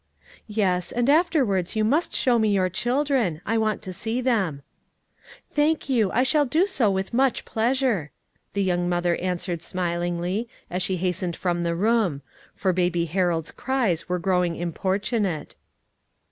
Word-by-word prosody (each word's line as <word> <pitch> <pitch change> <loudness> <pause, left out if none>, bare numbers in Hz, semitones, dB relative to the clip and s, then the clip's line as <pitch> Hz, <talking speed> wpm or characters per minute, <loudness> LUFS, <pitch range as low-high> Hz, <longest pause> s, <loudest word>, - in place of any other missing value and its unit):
"Yes, 190 -5 0
and 240 +1 0
afterwards 270 - +2
you 215 - +2
must 290 +11 +1
show 245 -2 +3
me 220 -1 +2
your 190 -2 +2
children. 240 - 0
I 225 0 +1
want 215 -1 0
to 185 -3 -6
see 225 +6 -2
them." 195 - 0 0.9
"Thank 300 0 +1
you; 225 -7 +3
I 250 - +3
shall 290 +3 +3
do 310 +7 +2
so 270 - +1
with 190 +2 -2
much 260 +1 +2
pleasure," 230 - 0 0.4
the 200 0 +1
young 175 -1 0
mother 175 -1 +1
answered 180 -2 -2
smilingly, 175 +4 -2 0.2
as 180 +1 -1
she 185 0 0
hastened 180 -1 -2
from 175 -2 -1
the 170 -1 0
room; 200 - +1 0.3
for 190 -2 +1
Baby 175 -1 +1
Harold's 170 -1 0
cries 245 -11 -1
were 180 - +1
growing 180 -1 +1
importunate. 190 - -2
195 Hz, 150 wpm, -24 LUFS, 175-240 Hz, 0.9 s, show